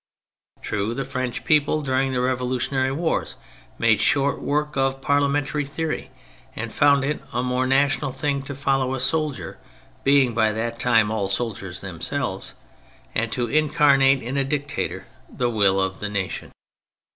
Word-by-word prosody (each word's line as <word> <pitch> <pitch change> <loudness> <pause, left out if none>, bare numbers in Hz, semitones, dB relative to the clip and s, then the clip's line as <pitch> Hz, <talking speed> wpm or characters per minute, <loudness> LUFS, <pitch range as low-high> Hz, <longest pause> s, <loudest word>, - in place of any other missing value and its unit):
True, 105 +2 -2
the 135 - -3
French 130 -2 -4
people 155 0 +2
during 135 0 +1
the 130 - -1
revolu 125 0 0
tionary 130 +1 0
wars 165 +1 -1 0.4
made 110 -2 +3
short 140 +5 +2
work 150 +1 -1
of 135 0 +1
parliamentary 145 0 +1
theory, 155 +3 -4 0.5
and 110 0 -5
found 140 -2 +4
it 150 +1 -2
a 125 - 0
more 125 +1 0
national 140 +1 +2
thing 140 +1 -1
to 140 - -4
follow 135 -1 0
a - - -4
soldier 150 +2 -1 0.4
(being 135 -3 +4
by 110 -1 +2
that 115 +1 -3
time 115 -3 +3
all 100 -3 -1
soldiers 100 -4 -3
themselves), 90 -5 -4 0.6
and - - -1
to 120 - 0
incarnate 140 -1 +4
in 125 +4 -3
a 140 - +2
dictator 145 +1 -3 0.2
the 120 -1 -1
will 100 -3 +3
of 95 0 -1
the 105 - -3
nation. 100 -3 -4
130 Hz, 155 wpm, -23 LUFS, 115-140 Hz, 0.6 s, found